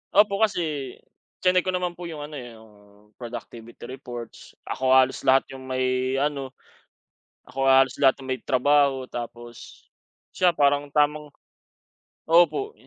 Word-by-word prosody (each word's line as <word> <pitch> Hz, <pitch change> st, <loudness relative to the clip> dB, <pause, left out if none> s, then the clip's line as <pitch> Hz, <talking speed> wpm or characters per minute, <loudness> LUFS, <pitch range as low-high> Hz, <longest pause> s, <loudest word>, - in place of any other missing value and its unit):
Opo 200 Hz, -1 st, +4 dB
kasi, 155 Hz, -, -1 dB, 0.5 s
chineck 180 Hz, 0 st, +3 dB
ko -, -, +2 dB
naman 180 Hz, -1 st, -1 dB
po 175 Hz, 0 st, -9 dB
yung 155 Hz, -3 st, -7 dB
ano, 150 Hz, +1 st, -9 dB
eh, 120 Hz, -2 st, -10 dB
yung 110 Hz, -1 st, -17 dB, 0.5 s
productivity 120 Hz, -1 st, -9 dB
reports, 120 Hz, -2 st, -9 dB
ako 130 Hz, 0 st, +1 dB
halos 130 Hz, 0 st, +3 dB
lahat 135 Hz, 0 st, +5 dB
yung 130 Hz, 0 st, -10 dB
may 130 Hz, 0 st, -1 dB
ano, 135 Hz, -2 st, -2 dB, 0.9 s
ako 135 Hz, +1 st, -2 dB
halos 135 Hz, 0 st, +4 dB
lahat 135 Hz, -2 st, +5 dB
ng -, -, -10 dB
may 130 Hz, -, -4 dB
trabaho 135 Hz, +1 st, +2 dB
tapos 120 Hz, -1 st, -9 dB, 0.5 s
siya 180 Hz, -3 st, +2 dB
parang 145 Hz, 0 st, +2 dB
tamang 150 Hz, +1 st, +1 dB, 1.0 s
opo, 175 Hz, -, +3 dB
135 Hz, 135 wpm, -24 LUFS, 130-150 Hz, 1.0 s, lahat